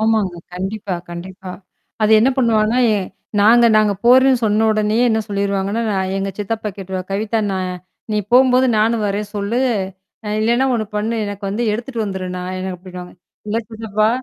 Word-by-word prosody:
ஆமாங்க. 220 -5 +1 0.2
கண்டிப்பா, 195 +1 -4 0.2
கண்டிப்பா. 185 +2 -8 0.5
அது 215 +1 +4
என்ன 255 - +4
பண்ணுவாங்கனா, 230 -2 +2 0.6
நாங்க 235 +3 +6
நாங்க 210 -1 +4
போறோம்னு 260 0 +5
சொன்ன 215 +1 +2
உடனேயே 215 +3 +1
என்ன 220 0 +1
சொல்லிவிடுவாங்கனா, 200 +2 -1
நான் 190 0 -1
எங்க 195 0 -2
சித்தப்பா 215 +1 -3
கேட்றுவார், 190 -1 -6
கவிதா 220 +2 0
நான் 185 -1 -2 0.4
நீ - - +1 0.2
போகும்பொது 255 0 +5
நானும் 220 0 +2
வர்றேன்னு 205 +1 -3
சொல், 205 +4 -2 0.7
ஆ - - -3
இல்லனா 235 +4 +2
ஒண்ணு 220 -2 -1
பண்ணு 220 +2 -1
எனக்கு 205 0 -6
வந்து 215 +4 -2
எடுத்துக்குண்னு 230 0 -3
வந்துடு 190 -1 -4
நான் 185 +1 -5
எனக்கு 185 -1 -4
அப்டின்பாங்க. 180 0 -10 0.3
இல்ல 215 +2 0
சித்தப்பா? 215 -1 0
210 Hz, 155 wpm, -19 LUFS, 195-225 Hz, 0.7 s, நாங்க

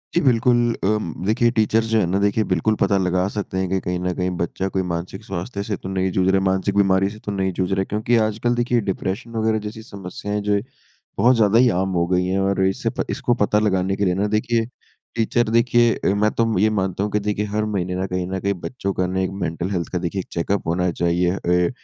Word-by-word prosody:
जी 175 - +4
बिल्कुल 125 -2 +3 0.3
अम, 105 -5 0
देखिए 115 +3 +2
टीचर्स 110 +1 +3
जो 110 -1 +3
है 90 - +2
ना 95 +3 0
देखिए 100 +2 +2
बिल्कुल 110 +1 +1
पता 100 - +3
लगा 90 0 +1
सकते 100 -2 -3
हैं 95 -1 -1
कि 95 +1 +1
कहीं 90 0 -2
ना 90 0 -1
कहीं 90 +1 -1
बच्चा 90 +3 -2
कोई 95 0 -1
मानसिक 90 +2 -5
स्वास्थ्य 95 +2 -4
से 105 0 -2
तो 95 - -7
नहीं 95 -1 0
जूझ 95 0 +1
रहा 95 0 +4
है, 95 - 0
मानसिक 95 +1 0
बीमारी 95 0 +3
से 105 - -11
तो 105 - -2
नहीं 95 -1 -1
जूझ 90 0 -1
रहा 95 - +1
है। 95 - +1
क्योंकि 110 +3 +1
आजकल 115 +3 -1
देखिए 120 -1 +1
डिप्रेशन 100 +6 -4
वगैरह 110 0 +1
जैसी 110 +1 -8
समस्याएँ 100 0 -5
जो - - +4
है 100 - +1 0.6
बहुत 125 +2 +5
ज़्यादा 110 0 +4
ही 125 - +5
आम 95 - -2
हो 85 - +2
गयी 90 0 +1
है 95 +1 0
और 95 0 +1
इसे 95 - 0
प - - +2
इसको 120 - 0
पता 105 +1 +2
लगाने 95 -2 +1
के 100 0 0
लिए 90 - +2
ना 100 +2 0
देखिए 115 +2 +1 0.5
टीचर 115 0 +1
देखिए 120 0 +4
अ, - - -3
मैं 105 +1 +2
तो 115 -2 0
ये 110 - +4
मानता 95 -2 -1
हूँ 105 - -2
कि 105 - +1
देखिए 105 0 -1
हर 105 +1 -1
महीने 90 -4 -2
ना 95 +1 -1
कहीं 90 -1 -2
ना 95 0 -3
कहीं 100 +1 0
बच्चों 110 -6 -3
का 90 - 0
ना 95 +1 -2
एक 95 - 0
मेंटल 85 +3 -2
हेल्थ 85 -3 -2
का 90 - -1
देखिए 90 +2 -3
एक 95 - -5
चेकअप 90 +3 -1
होना 90 +2 +1
चाहिए। 85 +1 +1
अ, 90 -1 +1
100 Hz, 250 wpm, -21 LUFS, 95-110 Hz, 0.6 s, बहुत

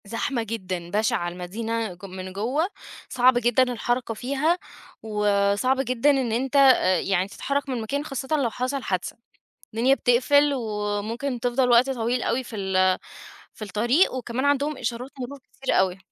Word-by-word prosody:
زحمة 230 +3 -2
جدًا، 185 -6 -5
بَشِعة، 205 -4 0
المدينة 215 +4 -4
ج 180 +3 -12
من 185 0 -8
جوّه 250 - 0 0.4
صعبة 250 -1 +4
جدًا 240 +2 +4
الحركة 245 -1 -1
فيها 280 +9 0 0.5
وصعب 210 +4 +1
جدًا 255 +2 +1
إن 265 -4 0
أنت 260 +4 -1
أ 260 -10 +5
يعني 190 -1 0
تتحرّك 280 +7 -3
من 250 -3 -2
مكان 280 +7 -3
خاصةً 270 -2 -5
لو 265 -5 +1
حصل 255 +3 -3
حادثة، 185 -2 -3 0.6
الدنيا 250 +4 +4
بتقفل 280 +4 +3
وممكن 220 +2 -3
تفضل 245 +1 +1
وقت 240 +3 +5
طويل 245 -1 -1
أوي 260 - 0
في 230 - -8
ال 185 -2 +2 0.6
في - - -12
الطريق 235 - +2
وكمان 250 0 -3
عندهم 285 0 +1
إشارات 245 +2 -4
مرور 270 +3 -6
كتيرة 270 -1 -2
أوي. 185 0 +2
240 Hz, 155 wpm, -24 LUFS, 205-265 Hz, 0.6 s, أ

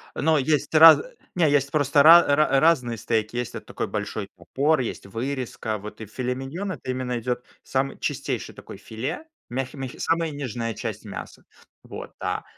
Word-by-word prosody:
Ну, 160 0 +2
есть 150 +3 0
раз 160 +1 +9 0.3
не, 165 -4 +3
есть 140 -1 +2
просто 145 -1 +3
ра 170 +3 +9
ра 145 -2 +3
разные 130 -8 +2
стейки. 110 +1 -1
Есть 120 -1 -3
вот - - -8
такой - - -4
большой 105 -1 -4
топор, 150 +3 +1
есть 120 -5 -4
вырезка, 115 0 -4
вот, 105 +2 -10
и 110 - -5
филе-миньон- 135 - -4
это 130 -5 -8
именно 125 -1 -3
идет 125 +1 -3 0.2
самый 135 +1 -2
чистейший 135 -4 -3
такой - - -11
филе, 130 - -5 0.2
мягкий 130 +2 -4
мягкий, 130 -2 -7
самая 165 -1 0
нежная 120 -5 -4
часть 110 0 -6
мяса, 100 - -8 0.4
вот, - - -9
да, - - -2
130 Hz, 165 wpm, -24 LUFS, 115-150 Hz, 0.4 s, раз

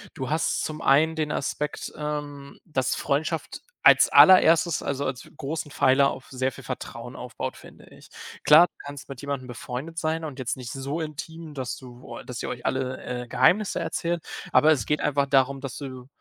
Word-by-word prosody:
Du 130 -2 -4
hast 155 +2 0
zum 155 0 -5
einen 155 +4 +4
den 155 -2 -1
Aspekt, 150 +1 -3
ähm, 145 -2 -6
dass 130 -6 -1
Freundschaft 155 +3 -2 0.2
als - - +7
allererstes, 170 -3 +6
also, 140 0 -2
als 130 -1 -5
großen 150 +2 -4
Pfeiler 140 0 +4
auf 130 - -8
sehr 130 0 -1
viel - - -12
Vertrauen - - -7
aufbaut, - - -6
finde - - -15
ich. - - -17 0.4
Klar, 160 +4 +8
du - - -58
kannst 145 -1 -9
mit 135 -3 -8
jemandem 140 -3 -4
befreundet 125 +6 -7
sein 160 +1 -1
und 145 -4 -6
jetzt 130 -2 -2
nicht 125 -2 -7
so 140 +4 -4
intim, 160 +1 -7
dass 130 -3 -4
du 125 -2 -13
oah, - - -8
dass 125 -1 -6
ihr - - -4
euch 120 -1 -7
alle, 130 -1 -2
äh, 125 -1 -5
Geheimnisse 180 - +2
erzählt, 170 +1 -2 0.3
aber 155 - +6
es 130 -9 +1
geht 150 - 0
einfach 140 -1 +1
darum, 135 0 +2
dass 135 -2 -6
du 130 -3 -8
140 Hz, 190 wpm, -25 LUFS, 130-155 Hz, 0.4 s, Klar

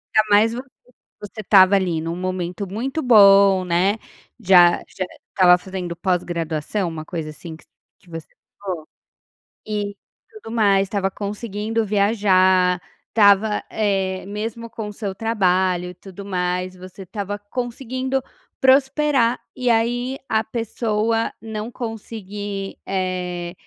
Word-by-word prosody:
Ainda 215 0 +4
mais 215 +2 +4
vo 250 +2 -5 0.6
você 205 +1 -8
estava 195 -1 +6
ali 180 -4 0
num 165 +1 -3
momento 185 +1 -3
muito 265 +9 -3
bom, 200 -5 +6
né, 180 +3 +2 0.4
já 180 -5 +6
já 185 - -5 0.3
estava 180 -2 +6
fazendo 180 -2 -6
pós-graduação, 175 0 -2
uma 160 -1 -6
coisa 160 -3 -5
assim 160 +2 -9
que - - -20
voc - - -31 0.3
que 180 -4 -21
você 165 -1 -8 0.3
falou, 180 -6 -5 0.8
e 205 -1 -3 0.4
tudo 320 - -9
mais, 200 -3 +4
estava 195 -1 -1
conseguindo 210 +2 -3
viajar, 190 -3 +3 0.3
estava, 210 0 +4
eh, 195 -3 -1
mesmo 225 +3 -5
com 220 -2 -6
o 210 - -7
seu 200 -2 -4
trabalho 185 -4 +1
e 180 - -9
tudo 195 +2 -11
mais, 180 -1 -2
você 185 +1 -11
estava 200 +2 -5
conseguindo 255 +4 -3 0.4
prosperar, 265 -2 +3 0.2
e 250 -1 -1
aí 245 +3 +1
a 220 0 +2
pessoa 225 0 -1
não 220 0 -5
conseguir, 205 -4 -6
eh, 180 -2 -3
200 Hz, 130 wpm, -21 LUFS, 185-225 Hz, 0.8 s, estava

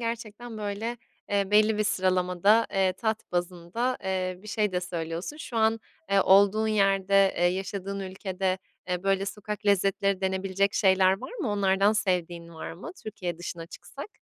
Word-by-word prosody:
gerçekten, 230 0 -5
böyle, 210 +3 -3 0.3
eee, 200 -1 +1
belli 215 +1 +4
bir 215 - +2
sıralamada, 185 +3 +2
eee, 190 -1 +2
tat 220 0 -3
bazında, 180 +8 -2
eee, 185 -1 -2
bir 215 - -11
şey 210 -2 0
de 180 - 0
söylüyorsun. 170 - -4
Şu 260 -6 -7
an, 220 0 +2 0.3
eee, 200 - +5
olduğun 200 +3 +5
yerde, 195 -1 +3
eee, 175 - +1
yaşadığın 195 +2 -2
ülkede, 190 0 -2 0.3
eee, 180 0 -1
böyle, 195 0 +1
sokak 210 +1 -6
lezzetleri 195 0 +2
denebilecek 190 +1 0
şeyler 190 -1 +4
var - - -8
mı? 360 - -3
Onlardan 200 0 +3
sevdiğin 175 -5 -1
var 160 - -6
mı 180 - -8
Türkiye 180 -6 -5
dışına 170 -1 -6
çıksak? 415 - -10
195 Hz, 155 wpm, -27 LUFS, 185-210 Hz, 0.3 s, eee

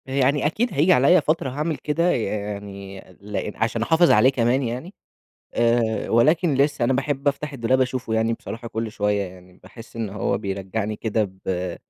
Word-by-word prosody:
يعني 135 +2 +1
أكيد 220 +11 0
هييجي 160 +6 +4
عليّا 160 +7 +5
فترة 155 -2 0
هاعمِل 150 +4 -2
كده، 170 +4 0
يعني 100 -2 -4 0.2
لإن 105 +1 -4
عشان 115 0 -1
أحافظ 165 +8 +4
عليه 110 +5 +6
كمان 125 +1 +1
يعني، 125 - -5 0.6
آآ 115 -1 +1
ولكن 155 +7 +3
لسه 140 -1 +1
أنا 125 - +2
باحب 140 +1 0
أفتح 145 +1 -2
الدولاب 130 0 +1
أشوفه 125 -3 -1
يعني 110 +1 +1
بصراحة 115 +1 -8
كل 110 0 -3
شوية 105 -1 0
يعني، 90 -1 -11
باحس 115 0 -13
إن 110 -3 -3
هو 100 0 -1
بيرجّعني 100 +2 -3
كده 110 -1 0 0.2
ب 90 -1 -2
120 Hz, 165 wpm, -23 LUFS, 105-140 Hz, 0.6 s, عليه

